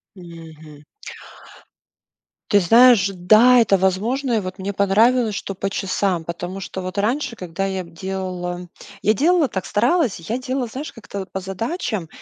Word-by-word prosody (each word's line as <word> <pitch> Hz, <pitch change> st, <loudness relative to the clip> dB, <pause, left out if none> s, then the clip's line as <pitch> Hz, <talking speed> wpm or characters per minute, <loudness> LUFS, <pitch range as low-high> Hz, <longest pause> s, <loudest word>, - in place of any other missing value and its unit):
Мгм. 160 Hz, -4 st, -13 dB, 1.7 s
Ты 205 Hz, -, +5 dB
знаешь, 230 Hz, +2 st, +6 dB
да, 215 Hz, +7 st, +5 dB
это 200 Hz, -3 st, +3 dB
возможно. 225 Hz, +8 st, 0 dB
И 220 Hz, -, +2 dB
вот 185 Hz, 0 st, -7 dB
мне 195 Hz, +2 st, -4 dB
понравилось, 215 Hz, +3 st, +2 dB
что 195 Hz, -, -5 dB
по 195 Hz, +1 st, -3 dB
часам. 185 Hz, -3 st, -1 dB
Потому 175 Hz, +3 st, -6 dB
что 190 Hz, 0 st, -6 dB
вот 185 Hz, +2 st, -6 dB
раньше, 235 Hz, +3 st, -1 dB
когда 180 Hz, +1 st, -4 dB
я 190 Hz, -2 st, -3 dB
б 170 Hz, -, -15 dB
делала, 180 Hz, 0 st, -5 dB, 0.4 s
я 215 Hz, -, +4 dB
делала 320 Hz, -, +3 dB
так, 190 Hz, -6 st, -4 dB
старалась: 245 Hz, -, +1 dB
я 210 Hz, +9 st, -4 dB
делала, 255 Hz, 0 st, -3 dB
знаешь, 265 Hz, +7 st, -7 dB
как-то 200 Hz, -5 st, -8 dB
по -, -, -3 dB
задачам. 195 Hz, -, -4 dB
195 Hz, 150 wpm, -21 LUFS, 185-235 Hz, 1.7 s, знаешь